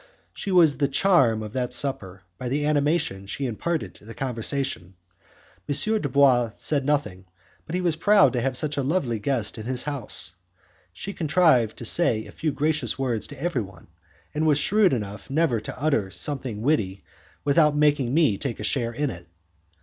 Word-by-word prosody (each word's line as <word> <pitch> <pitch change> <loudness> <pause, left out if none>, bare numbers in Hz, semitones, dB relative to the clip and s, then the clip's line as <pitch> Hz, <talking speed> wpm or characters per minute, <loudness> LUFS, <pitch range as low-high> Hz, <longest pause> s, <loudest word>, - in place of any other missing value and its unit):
She - - -6
was 170 -6 +4
the 140 - +2
charm 135 - +3
of 105 0 -8
that 125 -2 -2
supper 95 -9 -1 0.2
by 125 - -4
the 145 +3 -1
animation 145 - 0
she 135 +7 -4
imparted 155 +8 -3
to - - -19
the 115 - -10
conversation. 125 -6 -2 0.7
M. 145 - +1 0.3
Dubois 130 -5 +3
said 140 -3 -1
nothing, 140 -11 -1 0.4
but 160 - -4
he 185 - 0
was 170 -3 +1
proud 205 +3 +4
to 125 - 0
have 130 0 -1
such 150 +1 -2
a - - +1
lovely 135 -6 -1
guest 115 -1 -2
in 110 - -7
his 125 -1 0
house. 125 - -3 0.6
She 195 - -7
contrived 155 - +2
to 120 - -7
say 115 -6 +3
a - - -11
few 155 - -2
gracious 150 +1 -1
words 125 -5 -2
to 145 -2 -11
everyone, 115 - -4 0.4
and 155 +1 0
was 150 -2 +4
shrewd 200 +6 +3
enough 105 -3 -4
never 140 -5 +1
to 110 - -8
utter 135 -9 0
something 125 -2 -2
witty 105 -10 0 0.4
without 150 +1 +4
making 145 -4 +2
me 140 -9 +2
take 130 -5 -4
a - - -5
share 120 -4 -1
in 145 +2 -1
it. 85 -2 -11
135 Hz, 180 wpm, -24 LUFS, 115-150 Hz, 0.7 s, was